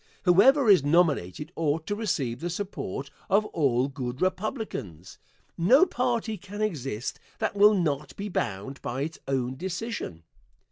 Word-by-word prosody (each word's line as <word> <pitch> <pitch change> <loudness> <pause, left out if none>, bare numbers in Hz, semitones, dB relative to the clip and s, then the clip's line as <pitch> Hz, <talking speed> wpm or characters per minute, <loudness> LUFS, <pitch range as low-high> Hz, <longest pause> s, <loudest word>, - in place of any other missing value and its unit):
Whoever 250 +9 +5
is 195 -8 +7
nominated 150 - +1
ought 160 0 0
to 205 - -2
receive 150 - -2
the 175 - -3
support 165 - -5 0.2
of 205 +2 +4
all 135 -5 +2
good 130 -2 -5
Republicans. 185 - -3 0.4
No 250 - +6
party 240 - -1
can 205 +2 -9
exist 135 - -3 0.2
that - - -2
will 210 +1 +6
not 150 -6 -1
be 200 - -5
bound 135 - -3
by 125 +3 -3
its 160 +2 -5
own 130 -1 -1
decision. 185 - -5
165 Hz, 140 wpm, -27 LUFS, 135-205 Hz, 0.4 s, is